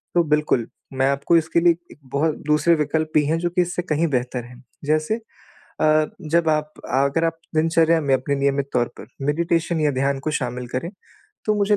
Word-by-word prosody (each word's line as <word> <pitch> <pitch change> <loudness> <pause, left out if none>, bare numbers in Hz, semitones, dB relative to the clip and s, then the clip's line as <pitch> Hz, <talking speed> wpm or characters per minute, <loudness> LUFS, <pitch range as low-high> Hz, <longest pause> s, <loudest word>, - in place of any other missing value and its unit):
तो 175 - +5
बिल्कुल, 150 -6 +2 0.3
मैं 130 0 +2
आपको 140 +5 +2
इसके 165 +1 +1
लिए 170 -1 +5 0.2
एक - - -15
बहुत 150 +2 +1
दूसरे 150 +3 +4
विकल्प 155 +1 -1
भी 150 - +5
हैं 160 +3 +1
जो 175 0 0
कि 180 +1 +1
इससे 175 0 -1
कहीं 165 -1 0
बेहतर 125 -2 -1
हैं। 125 +1 -14 0.2
जैसे 155 +7 +1 0.7
अ, 155 0 +4 0.3
जब 170 -1 +3
आप 150 0 0 0.2
अगर 140 +5 +2
आप 165 0 -1 0.2
दिनचर्या 165 +1 +3
में 140 -2 +1
अपने 140 +2 -1
नियमित 140 0 0
तौर 120 -1 +2
पर 105 - -10 0.2
मेडिटेशन 165 +2 0
या 150 -1 +3
ध्यान 135 +1 0
को 155 +3 -3
शामिल 125 -3 -3
करें, 130 +7 -3 0.6
तो 215 - +2
मुझे 205 0 +2
155 Hz, 195 wpm, -22 LUFS, 140-165 Hz, 0.7 s, तो